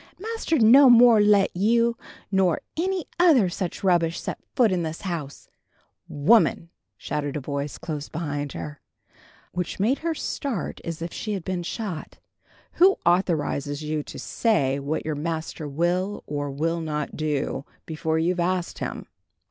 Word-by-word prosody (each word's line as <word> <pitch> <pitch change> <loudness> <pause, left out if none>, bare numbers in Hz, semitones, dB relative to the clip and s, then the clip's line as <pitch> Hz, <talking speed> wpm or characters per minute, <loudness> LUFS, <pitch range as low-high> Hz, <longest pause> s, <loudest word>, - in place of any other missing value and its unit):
"Master'd 400 - 0
no 260 +5 +8
more 240 -2 +7
let 205 -2 +4
you 230 +5 +2 0.4
nor 190 -4 +2
any 365 +1 -1
other 295 - +5
such 180 +1 -4
rubbish 170 -3 +2
set - - -5 0.2
foot 235 -5 +4
in 180 -2 0
this 160 0 -4
house 165 -7 -5 0.4
" - - -43 0.2
"Woman!" 215 -7 +4 0.3
shouted 145 +4 -3
a - - -2
voice 140 +1 -4
close 155 -3 -5
behind 145 -3 -4
her, 150 -2 -7 0.7
which 180 0 -4
made 235 +8 +2
her 330 0 -2
start 270 - -4
as 165 -1 -5
if 170 - -5
she 215 - -4
had 190 -4 -4
been 185 0 -2
shot, 180 -2 -5 0.6
"who 385 +2 +7
authorizes 155 -5 +1
you 150 0 -2
to - - -10
say 140 - +1
what 140 +3 -3
your 155 - -1
master 160 0 -4
will 175 +7 -1
or 145 -1 -3
will 165 +4 -1
not 150 -2 -3
do, 150 -3 -2 0.2
before 160 0 -2
you've 175 +3 0
asked 180 0 -1
him? - - -5
170 Hz, 155 wpm, -25 LUFS, 150-210 Hz, 0.7 s, no